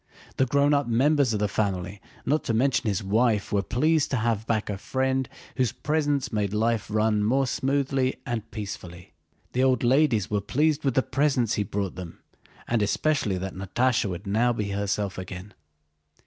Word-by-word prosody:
The 130 - +3
grown 140 +3 +3
up 145 -2 +2
members 135 +2 +3
of 105 - -1
the 105 - +1
family, 100 -1 -2 0.2
not 155 +2 +1
to 115 - 0
mention 130 0 +2
his 100 -2 0
wife, 105 +1 +1
were 100 - +3
pleased 155 +8 +1
to 130 - 0
have 110 -2 -1
back 110 -2 0
a 100 -2 -4
friend 130 +2 -1 0.3
whose 125 -5 +2
presence 145 -4 -1
made 105 -1 -1
life 115 0 +1
run 110 0 +1
more 135 +6 +2
smoothly 135 0 0
and 115 -3 -4
peacefully. 90 -5 -8 0.4
The 130 - +2
old 130 -3 +2
ladies 120 - +3
were 105 -1 -1
pleased 145 +8 +1
with 135 -4 0
the 130 - +3
presents 130 -4 +1
he - - 0
brought 100 -1 -3
them, 90 -3 -8 0.5
and 115 -2 +1
especially 105 -1 +1
that 95 +1 -4
Natásha 110 +4 0
would 90 +3 -6
now 110 +5 +2
be 105 -4 -2
herself 100 -1 -2
again. 95 +2 -8
115 Hz, 175 wpm, -26 LUFS, 100-130 Hz, 0.5 s, The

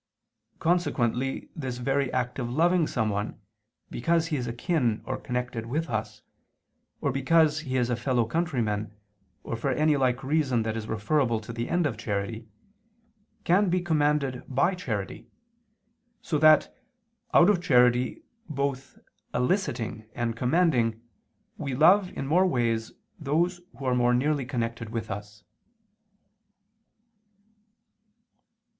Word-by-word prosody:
Consequently 135 -7 0
this 130 -6 -4
very 135 +1 0
act 125 +1 -2
of 120 -2 -2
loving 165 +5 +2
someone 105 -3 -2 0.5
because 165 +5 +1
he 155 - 0
is 125 -3 -2
akin 120 - 0
or 130 - -2
connected 125 -2 -4
with 150 +4 -2
us, 110 -1 -4 0.8
or - - +1
because 150 +4 +3
he 130 -4 -3
is 125 -2 +2
a - - +2
fellow 120 0 0
countryman 110 -8 -2 0.5
or - - -4
for 115 +4 -2
any 150 +4 +2
like 130 -2 +1
reason 135 -5 +1
that 110 0 -2
is 110 -1 -5
referable 115 +2 +1
to 110 +2 -9
the 115 +1 -4
end 175 0 +1
of 120 -7 -2
charity, 110 +1 -3 1.0
can 185 +3 +3
be 180 +1 +2
commanded 150 -6 +1
by 140 +8 +2
charity, 110 - -5 0.9
so 150 - -2
that, 155 0 +5 0.6
out 175 - +6
of 200 -4 +3
charity 125 - +3 0.3
both 140 -2 -3 0.4
eliciting 120 - -1
and 115 -1 -1
commanding, 125 -4 +2 0.6
we 135 -2 -3
love 180 +6 +5
in - - -3
more 180 +7 +3
ways 115 -7 0 0.3
those 170 +5 0 0.2
who 135 - -7
are 130 - +2
more 125 0 +3
nearly 140 0 0
connected 115 -4 -3
with 115 -1 -4
us. 105 +1 -8
130 Hz, 130 wpm, -27 LUFS, 115-155 Hz, 1.0 s, out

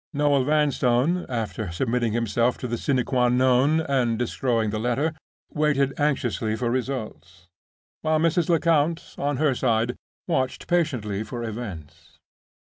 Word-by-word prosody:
Noel 145 -2 +2
Vanstone 150 +2 +2
(after 110 -6 -3
submitting 120 +5 0
himself 115 +2 +1
to 125 - -5
the 120 0 -3
sine 130 -3 0
qua 125 -2 +2
non, 130 +5 +3
and 130 -6 0
destroying 115 -2 0
the 110 - -2
letter) 135 +7 0 0.4
waited 145 -3 +1
anxiously 125 -6 0
for 120 +1 -1
results; 110 -9 -4 0.6
while 155 0 +2
Mrs. 165 +1 +1
Lecount, 165 -1 +1
on 145 -1 -1
her 150 -1 +2
side, 120 -1 0 0.3
watched 130 -7 -1
patiently 130 - 0
for 120 +2 -5
events. 105 -10 -8
125 Hz, 130 wpm, -24 LUFS, 115-145 Hz, 0.6 s, non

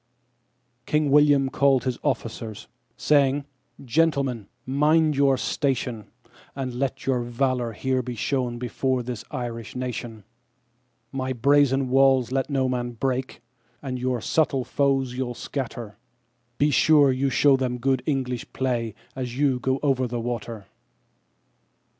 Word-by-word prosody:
King 150 -2 +1
William 145 -2 +5
called 135 -3 +3
his 130 -2 -2
officers, 110 -2 -3 0.3
saying: 140 -1 +2 0.4
"Gentlemen, 135 -5 +1 0.2
mind 150 +3 +3
your 135 -1 +3
station, 125 -6 -2 0.5
And 130 -2 -4
let 135 +1 -3
your 130 -2 +1
valour 120 0 -1
here 130 +4 0
be 125 0 -6
shown 125 0 -1
before 125 +1 -1
this 120 -3 -5
Irish 120 -4 -5
nation; 120 -3 -5 0.9
My 130 -1 -2
brazen 135 +1 +3
walls 135 -1 +4
let 135 +1 -1
no 135 -2 +1
man 120 -1 -2
break, 130 +1 -3 0.4
and 130 -2 -4
your 125 -1 -1
subtle 140 0 +1
foes 135 -3 +1
you'll 125 -1 -3
scatter, 120 -6 -5 0.6
Be 145 +1 +3
sure 145 0 +5
you 135 +2 0
show 140 +1 +4
them 130 -2 -1
good 130 +1 +1
English 130 -4 -2
play 120 -4 -1 0.2
as 125 -2 -5
you 135 -3 +2
go 130 +2 0
over 130 -3 +2
the 120 0 -3
water." 115 -3 -5
130 Hz, 130 wpm, -24 LUFS, 120-135 Hz, 0.9 s, William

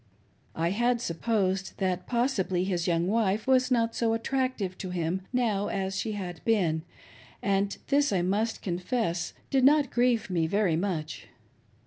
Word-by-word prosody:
I 165 +2 0
had 240 +4 +1
supposed 195 0 -1
that, 185 -2 -1
possibly, 220 -8 0
his 180 -2 -1
young 170 -1 +2
wife 210 0 +1
was 255 -1 +3
not 230 -2 +2
so 230 -1 +1
attractive 245 -5 -1
to 185 - -5
him 180 +1 -1
now 220 -6 +1
as 190 0 -2
she 215 +2 -2
had 180 -4 -6
been; 180 -8 +2 0.6
and 200 0 0
this 285 +1 +3
I 185 -3 +1
must 210 +5 -1
confess, 180 -1 -2 0.2
did 270 -2 +3
not 285 0 +5
grieve 240 -4 +1
me 165 -3 +1
very 200 -2 +2
much. 165 -3 -3
200 Hz, 150 wpm, -28 LUFS, 180-235 Hz, 0.6 s, not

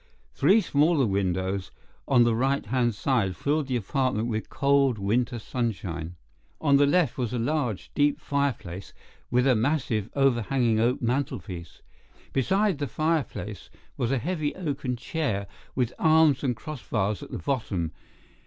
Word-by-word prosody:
Three 220 +3 +4
smaller 150 -4 +3
windows 95 -1 -1 0.4
on 125 -3 +5
the 120 -1 +3
right 135 +4 +1
hand 120 0 +1
side 105 -6 0
filled 145 - 0
the 130 - -1
apartment 120 0 0
with 110 -1 -3
cold 140 -3 +2
winter 115 +4 0
sunshine. 95 -9 -3 0.4
On 140 -3 +4
the 145 0 +4
left 150 -4 +2
was 125 -2 -1
a - - 0
large, 120 - -1
deep 145 0 +2
fireplace, 115 -10 -2 0.4
with 125 +1 +2
a 135 - +5
massive, 115 -3 0
overhanging 120 -3 +2
oak 120 +3 +1
mantelpiece. 115 - -3 0.5
Beside 190 - +1
the 145 - -1
fireplace 150 - -2 0.3
was 120 0 -1
a 135 - +2
heavy 155 +1 -2
oaken 145 -8 -3
chair 120 - -2 0.3
with 125 -2 0
arms 155 -3 +4
and 125 -3 +1
cross 145 +4 -7
bars 105 -1 -1
at - - -9
the - - -5
bottom. 100 - -2
125 Hz, 145 wpm, -26 LUFS, 110-145 Hz, 0.5 s, on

